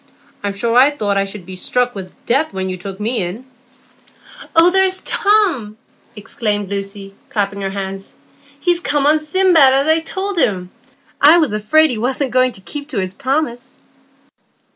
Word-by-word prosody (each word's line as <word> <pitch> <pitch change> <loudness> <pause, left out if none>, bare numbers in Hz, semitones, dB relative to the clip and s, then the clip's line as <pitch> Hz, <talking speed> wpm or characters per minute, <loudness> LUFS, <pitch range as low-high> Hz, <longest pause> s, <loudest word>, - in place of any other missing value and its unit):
I'm 200 -1 -2
sure 230 +4 -1
I 260 +3 +6
thought 210 -9 -2
I 195 - +1
should 195 -2 -8
be 185 +1 -9
struck 245 +6 -1
with 190 -2 -10
death 280 +6 0
when 190 0 -3
you 185 - -5
took 195 +2 -8
me 225 +2 -1
in." 185 +8 -5 1.1
"Oh, 335 +2 +6
there 380 +1 +4
is 375 0 +1
Tom!" 365 - +1 0.4
exclaimed 205 -1 -3
Lucy, 195 0 -5 0.2
clapping 200 -2 -2
her 195 - -2
hands. 195 0 -6 0.4
"He's 350 -1 +1
come 290 -4 0
on 305 +2 +4
Sindbad, 315 -3 +4
as 275 +1 +2
I 315 +1 +4
told 380 +3 -4
him. 185 - 0 0.5
I 305 +4 +7
was 310 -10 +1
afraid 305 +9 +3
he 230 - -3
was 255 +3 -2
not 275 -4 -1
going 255 0 +2
to 195 - -11
keep 290 +8 -7
his 190 -9 -3
promise." 265 -2 -3
245 Hz, 175 wpm, -17 LUFS, 200-305 Hz, 1.1 s, I